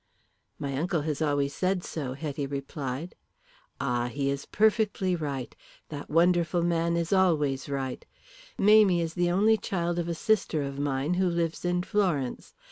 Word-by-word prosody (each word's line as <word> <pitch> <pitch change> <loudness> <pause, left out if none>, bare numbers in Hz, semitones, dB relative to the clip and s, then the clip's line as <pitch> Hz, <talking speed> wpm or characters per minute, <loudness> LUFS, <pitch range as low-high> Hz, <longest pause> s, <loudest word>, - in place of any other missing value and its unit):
"My 140 -1 -3
uncle 170 +1 0
has 150 0 -3
always 145 -2 +1
said 185 +2 0
so," 135 -5 -4
Hetty 145 0 -4
replied. 140 +2 -5 0.7
"And 125 -2 -1
he 140 0 -1
is 140 0 -5
perfectly 210 -4 +2
right. 140 -6 -4 0.3
That 145 -2 -7
wonderful 170 +1 +3
man 170 0 +1 0.2
always 150 -8 +2
is - - -10
right. 135 -2 -3 0.5
Mamie 205 -4 +5
is 165 -1 -4
the 175 0 +1
only 210 +5 +4
child 175 -4 -2
of 170 - -2
a 170 - -1
sister 175 -6 +1
of 140 0 -5
mine 140 +3 0
who 185 - +3
lives 170 -1 -1
in 180 0 0
Florence. 180 - -1
165 Hz, 155 wpm, -28 LUFS, 140-180 Hz, 0.7 s, Mamie